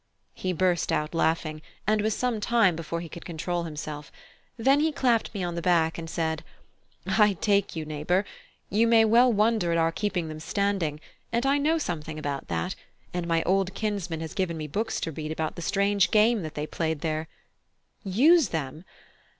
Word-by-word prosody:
He 185 - -3
burst 180 -1 +1
out 150 +2 -1
laughing, 160 -2 0 0.2
and 215 0 +2
was 215 0 0
some 245 -3 -1
time 210 -5 +3
before 165 +1 -4
he 170 - -7
could 170 - -10
control 170 +1 -3
himself; 150 -2 -6 0.5
then 270 +5 +4
he 315 +1 +2
clapped 245 -6 +1
me 200 -4 -4
on 175 -1 -2
the 170 - -3
back 170 -2 +2
and 165 -1 -6
said: 160 -1 -2 0.6
"I 210 -2 +4
take 200 +1 +1
you, 160 -1 -3
neighbour; 155 +6 0 0.4
you 225 +3 +2
may 225 -1 +6
well 240 +3 +5
wonder 215 -4 +2
at 170 - +2
our 165 0 +2
keeping 180 -2 -2
them 155 0 -7
standing, 190 -4 -1 0.3
and 235 +2 0
I 280 +1 +3
know 310 +3 +2
something 160 - -4
about 145 -2 -4
that, 85 -1 -2 0.4
and 175 -1 -2
my 165 -1 +2
old 190 +1 +1
kinsman 195 -7 -2
has 160 - -5
given 185 -5 -1
me 155 - -4
books 215 +10 -2
to 165 - -2
read 155 0 -5
about 160 0 -3
the - - -7
strange 200 +1 +2
game 220 +1 +4
that 155 -2 -6
they 150 - -2
played 160 -1 -2
there. 155 0 -2 0.8
Use 270 - +5
them! 155 0 -4
175 Hz, 190 wpm, -27 LUFS, 160-215 Hz, 0.8 s, may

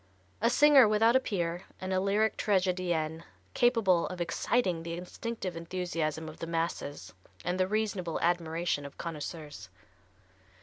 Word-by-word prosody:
A 230 - +4
singer 280 -1 +7
without 225 +3 +4
a - - +7
peer, 175 -7 -2
and 185 0 -3
a 185 - +2
lyric 205 +3 +2
tragedienne 180 -5 0 0.3
capable 220 -8 +3
of 180 - -7
exciting 175 +1 0
the 165 0 -5
instinctive 185 +1 -5
enthusiasm 165 -2 -3
of 155 - -10
the 165 - -5
masses 165 -3 -3 0.3
and 180 +1 -1
the 185 - +3
reasonable 200 -5 -1
admiration 170 -2 0
of 140 - -10
connoisseurs. 155 -1 -6
180 Hz, 135 wpm, -30 LUFS, 165-205 Hz, 0.3 s, singer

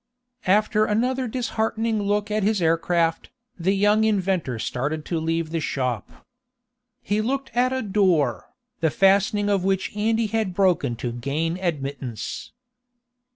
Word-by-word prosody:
After 210 +2 +3
another 250 +5 0
disheartening 225 -2 -1
look 205 +1 0
at 215 0 +1
his 210 +1 +1
air 165 -1 +3
craft, 165 0 0 0.3
the 190 +4 +1
young 205 +2 +3
inventor 190 - 0
started 145 +7 -3
to 170 - -1
leave 165 0 -1
the 165 - -1
shop. 125 -7 -3 0.8
He 210 +1 0
looked 265 +3 -2
at 250 +2 +2
a 260 0 -1
door, 185 - +1 0.3
the 160 - +2
fastening 200 +4 +3
of 200 -3 +1
which 190 +1 -1
Andy 220 +2 +1
had 215 -4 -1
broken 175 -10 +2
to 120 +1 -4
gain 145 +8 -2
admittance. 140 - -4
195 Hz, 140 wpm, -24 LUFS, 160-215 Hz, 0.8 s, After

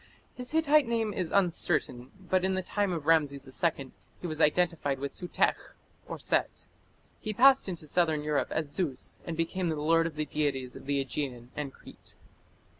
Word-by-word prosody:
His 250 0 -6
Hittite 305 -3 +4
name 225 -2 0
is 180 -3 -2
uncertain, 165 -9 +2
but 185 -1 0
in 190 0 +1
the 185 - -1
time 205 +1 -1
of 165 -4 -3
Rameses 145 -4 +2 0.2
II 140 -6 0 0.3
he - - -8
was 155 -3 -3
identified 155 -3 +2
with 140 +1 -4
Sutekh 180 - -1 0.4
(Set). - - 0 0.5
He 215 - -4
passed 260 0 +5
into 170 -4 -5
southern 155 -1 +1
Europe 150 -1 0
as 155 -2 -2
Zeus, 150 -5 -3
and 165 -1 -4
became 170 +2 -1
"the 160 - -1
lord" 165 +2 +2
of 160 - -8
the 155 0 -2
deities 140 -5 -2
of - - -11
the 140 0 +1
Aegean 125 -2 -4
and 145 -2 -4
Crete. - - -11
165 Hz, 175 wpm, -29 LUFS, 145-185 Hz, 0.5 s, passed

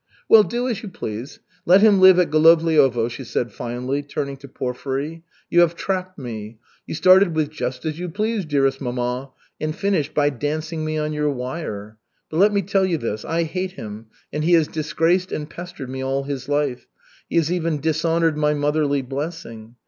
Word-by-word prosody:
"Well, 220 - +8
do 240 +4 -2
as 235 -5 -2
you 210 - -7
please. 115 - -7 0.2
Let 185 +3 +6
him 205 -3 +5
live 185 -1 +8
at 180 -2 +2
Golovliovo," 155 -6 +4
she 120 +3 -7
said 120 0 -2
finally, 125 +4 -3
turning 140 -1 -4
to 140 +1 -12
Porfiry. 135 +5 -4 0.3
"You 175 - +3
have 170 -1 +4
trapped 185 0 -3
me. 110 -5 -7 0.3
You - - -4
started 185 0 +5
with 155 -1 0
'just 130 -4 -4
as 155 +1 -3
you 180 0 -4
please, 215 +4 -1
dearest 135 -3 +1
mamma,' 125 +1 -3 0.3
and 155 0 -2
finished 170 -7 -1
by 145 -1 +3
dancing 155 +4 -3
me 155 0 -2
on 155 0 -2
your 150 0 0
wire. 125 -6 -5 0.3
But 155 - -3
let 205 +4 +5
me 200 -1 +1
tell 195 +1 +1
you 170 -3 0
this, 110 -6 -4
I 170 +1 0
hate 185 +3 -3
him 110 - -8 0.3
and 150 +1 -1
he 175 +2 +3
has 160 -3 +5
disgraced 165 +4 0
and 150 - -3
pestered 155 -6 -8
me 130 0 -4
all 135 +1 -1
his 135 -1 -5
life, 145 -3 -1 0.4
he - - -4
has 165 -1 +2
even 165 -4 -1
dishonored 160 +1 +1
my 150 0 +2
motherly 145 -1 +1
blessing. 130 -5 -6
150 Hz, 190 wpm, -22 LUFS, 135-170 Hz, 0.4 s, Well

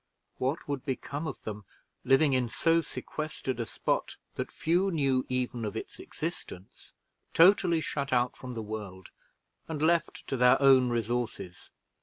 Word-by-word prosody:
What 135 +5 -1
would 140 -3 -3
become 140 +2 -4
of 140 - -7
them 105 -1 -6 0.4
living 135 +2 +4
in 125 -2 +1
so 165 +6 +2
sequestered 155 -5 -5
a 115 - -2
spot - - -2 0.2
that - - -4
few 175 +4 +1
knew 135 -7 +1
even 125 -2 -2
of 105 -2 -3
its - - -7
existence 90 +2 -7 0.4
totally 170 -1 +5
shut 140 -3 -3
out 125 0 +2
from 125 -1 -8
the 110 - -4
world, 105 -4 -7 0.6
and 160 -2 -4
left 165 +2 +1
to 135 - -1
their 125 0 +5
own 130 -2 +6
resources? 115 -6 -3
130 Hz, 150 wpm, -29 LUFS, 120-155 Hz, 0.6 s, own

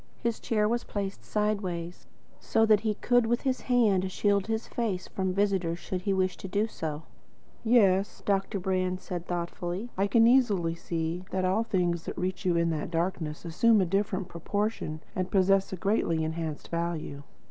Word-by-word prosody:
His 235 -1 0
chair 210 -2 +1
was 235 +2 0
placed 200 -1 -4
sideways, 190 -5 -2 0.3
so 225 0 +2
that 215 -2 +5
he 215 -1 -1
could, 245 +1 +2
with 240 +2 +1
his 260 -2 -1
hand, 205 -7 +2
shield 200 0 +1
his 225 0 -2
face 210 -6 -2
from 190 -1 -2
his 185 - -1
visitor 195 -4 +1
should 180 +1 -4
he 200 - -1
wish 185 -1 +1
to - - -7
do 205 +3 +1
so. 160 -8 -5 0.6
"Yes," 205 -4 +3
Dr. 195 0 0
Brand 185 -1 0
was 185 - -11
saying 175 -2 -4
thoughtfully, 175 +5 -3
"I 195 +2 +1
can 225 +3 +5
easily 210 -9 +3
see 165 +1 -3
that 185 -1 -1
all 190 +4 +2
things 175 -6 0
which - - -5
reach 185 +2 -3
you 175 -2 +3
in 170 0 +2
that 155 -1 -3
darkness 165 -2 -2
assume 215 +7 +4
a 190 - +3
different 195 0 -1
proportion 170 -2 -3
and 185 0 -1
possess 195 0 +3
a - - -2
greatly 175 -4 +1
enhanced 160 -1 -4
value. 170 -4 -3
190 Hz, 180 wpm, -28 LUFS, 175-210 Hz, 0.6 s, that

